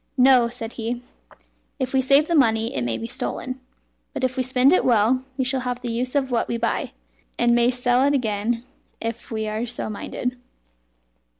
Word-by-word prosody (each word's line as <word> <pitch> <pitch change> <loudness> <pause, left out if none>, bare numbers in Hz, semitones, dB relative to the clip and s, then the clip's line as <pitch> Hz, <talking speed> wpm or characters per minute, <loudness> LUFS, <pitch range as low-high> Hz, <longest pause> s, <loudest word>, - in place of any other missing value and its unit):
"No," 250 -2 +6
said 235 -1 -6
he, 235 +2 -2 0.8
"if 260 -1 -3
we 265 - +4
save 275 +3 +4
the 340 - 0
money 225 -6 +3
it 130 - -1
may 120 -1 -1
be - - -5
stolen, 255 +2 -4 0.5
but - - -3
if 255 0 0
we 260 - 0
spend 255 +3 +4
it - - +3
well, 245 +2 +3
we 260 - 0
shall 265 +1 0
have 250 -1 -3
the 240 -1 -3
use 250 +4 -2
of 265 -2 +1
what 235 - +1
we 235 - -2
buy, 230 0 -2 0.4
and 240 0 +3
may 240 0 +4
sell 245 0 +2
it 285 0 +3
again 230 -1 -1 0.4
if 230 +1 -5
we 220 -1 -3
are 215 +3 -2
so 235 -2 -4
minded." 250 +4 -4
245 Hz, 195 wpm, -23 LUFS, 230-260 Hz, 0.8 s, No